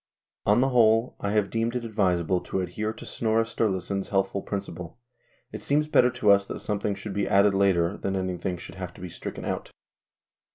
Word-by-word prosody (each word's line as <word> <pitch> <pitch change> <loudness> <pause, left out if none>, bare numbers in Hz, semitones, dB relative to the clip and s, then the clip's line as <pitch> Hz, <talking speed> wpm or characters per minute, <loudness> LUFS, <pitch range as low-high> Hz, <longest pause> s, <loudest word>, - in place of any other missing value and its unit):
On 105 +4 +5
the 135 - +3
whole 115 -1 +4
I 100 - -2
have 105 -2 +1
deemed 115 +1 -1
it 120 -1 -2
advisable 90 -5 +1
to 95 - -2
adhere 100 +5 -3
to - - -10
Snorre 115 0 +1
Sturlason's 100 -4 -2
healthful 95 0 0
principle: 95 -4 -6 0.3
" - - -39
It - - -6
seems 150 +2 +1
better 125 -5 +5
to 115 -4 +3
us 100 0 +5
that - - -5
some 105 -1 -2
thing 100 0 -1
should 100 +1 -6
be 100 0 -1
added 100 +1 +5
later 95 -2 +2
than 95 - -2
that 95 - 0
anything 90 0 -3
should 85 - -10
have 90 -1 -6
to - - -13
be 90 - -6
stricken - - -7
out." - - -3
100 Hz, 210 wpm, -26 LUFS, 95-110 Hz, 0.3 s, On